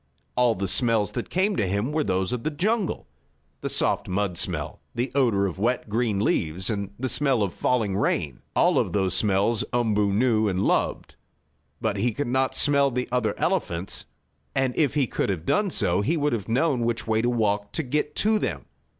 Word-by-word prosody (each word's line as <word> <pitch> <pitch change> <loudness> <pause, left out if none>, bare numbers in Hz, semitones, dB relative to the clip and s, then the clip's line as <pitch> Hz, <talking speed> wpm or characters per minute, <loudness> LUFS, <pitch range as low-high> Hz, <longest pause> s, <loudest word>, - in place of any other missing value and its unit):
All 125 -2 +3
the 100 +1 -2
smells 110 0 +2
that - - -5
came 195 +3 +1
to 100 - +1
him 100 +8 -1
were 155 0 +1
those 95 -2 0
of 125 -2 -3
the - - 0
jungle 200 +7 -1 0.6
the - - -3
soft - - +1
mud 95 -1 -1
smell, - - -2 0.2
the 120 +2 -1
odor 115 -8 +2
of 95 -1 -4
wet, 120 +1 0
green 110 -1 0
leaves 95 -2 0
and 100 -2 -3
the 130 - -1
smell 130 -2 +1
of 100 - -1
the - - -21
falling 110 -6 +1
rain. 80 -9 -1
All - - +4
those 95 -3 -1
smells 105 +2 +2
Umboo 105 -4 +1
knew 110 0 +2
and 95 -1 0
loved. - - 0 0.6
But 110 -3 -1
he 120 +3 0
could 145 - -2
not 130 +2 0
smell 140 -1 +4
the 125 0 -2
other 120 -4 0
elephants, 85 +3 -2 0.5
and 130 -2 +1
if 145 -2 +1
he 145 -3 +3
could 110 - -2
have 90 -4 -3
done 205 - +2
so 90 - +1
he 155 +11 0
would 150 -2 +1
have 110 -2 -3
known 135 +3 +2
which 115 0 -1
way 110 0 +1
to 120 - +1
walk 105 -3 0
to 160 - -1
get 150 +3 -2
to 215 0 +2
them. - - -3
115 Hz, 200 wpm, -25 LUFS, 100-130 Hz, 0.6 s, All